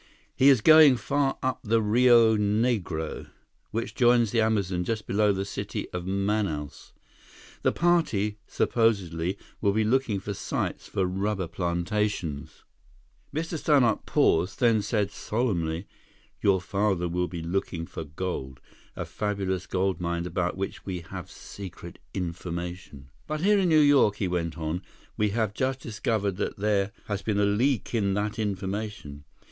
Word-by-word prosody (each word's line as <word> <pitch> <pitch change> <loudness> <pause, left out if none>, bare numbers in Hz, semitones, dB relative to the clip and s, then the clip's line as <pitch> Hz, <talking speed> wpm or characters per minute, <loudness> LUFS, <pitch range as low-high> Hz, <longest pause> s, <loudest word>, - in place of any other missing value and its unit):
"He 135 - +6
is 130 -6 +5
going 155 -2 +8
far 135 +5 0
up 130 -1 0
the 115 +1 +2
Rio 115 +1 +5
Negro, 105 -6 -1 0.4
which 115 +2 -3
joins 120 -3 +4
the 115 - +2
Amazon 100 -5 +1
just 110 +3 -3
below 105 +1 +2
the 95 0 -2
city - - -4
of 90 0 -5
Manaus. 100 -6 -2 0.7
The - - +2
party 115 - +1
supposedly 95 -6 0 0.2
will 100 -2 +2
be 110 +1 +2
looking 115 -2 +1
for 100 +2 -5
sites - - -3
for 95 - 0
rubber 95 0 -1
plantations." 85 -2 -2 0.7
Mr. 160 +2 -3
Stannart 135 -9 +3
paused, 85 +4 +2
then 115 -3 +4
said 105 -1 -1
solemnly, 90 -8 -2 0.6
"Your 95 -2 +3
father 95 -1 0
will 90 +1 -1
be 85 -2 -6
looking 85 -1 -2
for 80 - -7
gold—a 75 -4 -7
fabulous 95 -3 -2
gold 95 0 0
mine 85 0 -2
about 90 +1 -2
which 95 0 -4
we 90 -3 -4
have 85 - -8
secret 95 -3 -10 0.2
information. 85 -5 -5 0.2
But 155 0 -3
here 205 +2 +4
in 185 -2 +2
New 155 -1 +5
York," 145 -8 +5
he 100 - -1
went 85 -2 -2
on, 80 +2 -3 0.3
"we 105 0 +1
have 110 -1 -1
just 130 +3 -1
discovered 105 -4 -2
that - - -3
there 100 0 +1
has 105 -1 -3
been 100 0 -1
a 100 - +4
leak 115 +3 +1
in 100 -4 +1
that 105 +2 -2
information. 100 -6 -4
100 Hz, 145 wpm, -27 LUFS, 90-115 Hz, 0.7 s, going